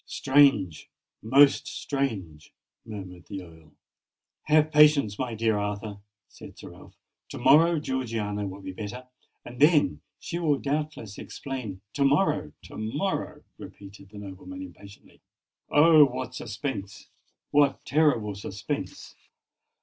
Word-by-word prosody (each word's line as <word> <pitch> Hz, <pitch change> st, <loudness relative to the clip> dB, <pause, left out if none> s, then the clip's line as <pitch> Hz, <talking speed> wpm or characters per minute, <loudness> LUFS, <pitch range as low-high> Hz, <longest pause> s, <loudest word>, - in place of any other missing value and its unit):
"Strange!—most 135 Hz, -, +2 dB
strange!" 100 Hz, -, -4 dB, 0.4 s
murmured 95 Hz, -5 st, -9 dB
the 95 Hz, -2 st, -7 dB
Earl. 80 Hz, -3 st, -17 dB, 0.7 s
"Have 155 Hz, 0 st, +3 dB
patience, 150 Hz, -9 st, +5 dB
my 125 Hz, -3 st, -3 dB
dear 110 Hz, -1 st, +1 dB
Arthur," 105 Hz, 0 st, -4 dB, 0.3 s
said -, -, -14 dB
Sir -, -, -11 dB
Ralph. -, -, -16 dB, 0.3 s
"To -, -, -7 dB
morrow 165 Hz, +2 st, +5 dB
Georgiana 115 Hz, -7 st, -3 dB
will 95 Hz, +1 st, -8 dB
be 95 Hz, 0 st, -6 dB
better; 110 Hz, +6 st, -7 dB, 0.4 s
and 120 Hz, 0 st, -10 dB
then 145 Hz, -, +4 dB, 0.2 s
she 170 Hz, -, -5 dB
will 150 Hz, -4 st, +2 dB
doubtless 145 Hz, -8 st, -4 dB
explain——" 120 Hz, -9 st, -7 dB
"To 140 Hz, -, 0 dB
morrow—to 140 Hz, -, 0 dB
morrow!" 145 Hz, -, -3 dB, 0.2 s
repeated 100 Hz, -1 st, -12 dB
the 105 Hz, -, -13 dB
nobleman 100 Hz, -, -9 dB
impatiently. 100 Hz, -, -15 dB, 0.5 s
"Oh! 155 Hz, 0 st, +7 dB
what 130 Hz, -1 st, -5 dB
suspense—what 135 Hz, -, -3 dB
terrible 140 Hz, -9 st, +2 dB
suspense! 100 Hz, 0 st, -6 dB
120 Hz, 110 wpm, -26 LUFS, 100-145 Hz, 0.7 s, Oh